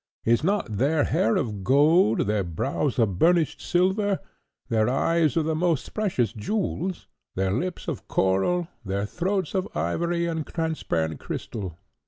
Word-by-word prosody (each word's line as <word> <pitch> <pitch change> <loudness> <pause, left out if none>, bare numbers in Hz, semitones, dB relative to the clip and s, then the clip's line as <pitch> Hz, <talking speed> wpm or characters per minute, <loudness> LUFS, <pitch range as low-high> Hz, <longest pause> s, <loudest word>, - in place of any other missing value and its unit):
Is 115 +4 +3
not 175 - 0
their 145 +3 +3
hair 190 +6 +2
of 110 - -2
gold, 140 - +4
their 105 -1 +1
brows 130 - -2
of 100 -7 +1
burnished 165 -3 +3
silver, 190 +3 +1 0.5
their 110 -2 +2
eyes 155 +3 +2
of 160 - +2
the 160 - 0
most 165 -2 0
precious 175 - 0
jewels, 185 - -2 0.3
their 95 0 0
lips 170 - -3
of - - -4
coral, 95 - +1 0.2
their 100 0 -2
throats 185 - -2
of 190 -1 0
ivory 170 - 0
and 160 -2 -2
transparent 155 - -2
crystal? 95 -7 -5
155 Hz, 145 wpm, -25 LUFS, 105-175 Hz, 0.5 s, gold